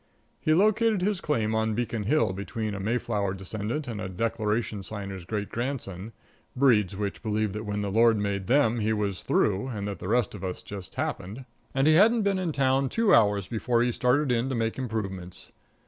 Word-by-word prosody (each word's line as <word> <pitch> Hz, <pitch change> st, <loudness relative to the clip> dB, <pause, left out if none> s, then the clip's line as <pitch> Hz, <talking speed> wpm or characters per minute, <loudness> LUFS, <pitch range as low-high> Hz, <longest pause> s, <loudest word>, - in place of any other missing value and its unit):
He 155 Hz, -, +2 dB
located 215 Hz, +1 st, +3 dB
his 200 Hz, -2 st, 0 dB
claim 110 Hz, -7 st, 0 dB
on 110 Hz, 0 st, 0 dB
Beacon 115 Hz, -2 st, -2 dB
Hill, 115 Hz, -5 st, +2 dB
between 105 Hz, +2 st, -4 dB
a 100 Hz, -, -4 dB
Mayflower 105 Hz, -2 st, -1 dB
descendant 110 Hz, +9 st, -4 dB
and 110 Hz, -3 st, -4 dB
a 95 Hz, -, -4 dB
Declaration 110 Hz, +1 st, -1 dB
Signer's 100 Hz, -2 st, -7 dB
great 105 Hz, +1 st, -3 dB
grandson, 115 Hz, -5 st, -4 dB, 0.4 s
breeds 110 Hz, -8 st, +3 dB
which 100 Hz, 0 st, -4 dB
believe 110 Hz, -2 st, -1 dB
that 105 Hz, +1 st, -5 dB
when 105 Hz, 0 st, -2 dB
the 100 Hz, -, -2 dB
Lord 115 Hz, +1 st, +4 dB
made 100 Hz, -2 st, -2 dB
them 120 Hz, -3 st, +3 dB
He 110 Hz, +1 st, +1 dB
was 100 Hz, -3 st, -2 dB
through, 100 Hz, +3 st, +1 dB
and 105 Hz, -5 st, -4 dB
that 100 Hz, -, -5 dB
the -, -, -6 dB
rest 120 Hz, +1 st, +1 dB
of 100 Hz, -3 st, -8 dB
us 90 Hz, -1 st, -4 dB
just 100 Hz, -2 st, -8 dB
happened. 110 Hz, +8 st, -4 dB, 0.3 s
And 135 Hz, 0 st, +3 dB
he 155 Hz, -, +6 dB
hadn't 220 Hz, +6 st, +5 dB
been 200 Hz, -1 st, +1 dB
in 180 Hz, -3 st, -1 dB
town 135 Hz, -1 st, +2 dB
two 225 Hz, -, +2 dB
hours 100 Hz, -4 st, +4 dB
before 115 Hz, +2 st, +1 dB
he 120 Hz, -, +1 dB
started 125 Hz, +4 st, +2 dB
in 120 Hz, +2 st, +1 dB
to 130 Hz, -, -1 dB
make 115 Hz, +1 st, -1 dB
improvements. 95 Hz, -7 st, -5 dB
110 Hz, 195 wpm, -27 LUFS, 100-130 Hz, 0.4 s, he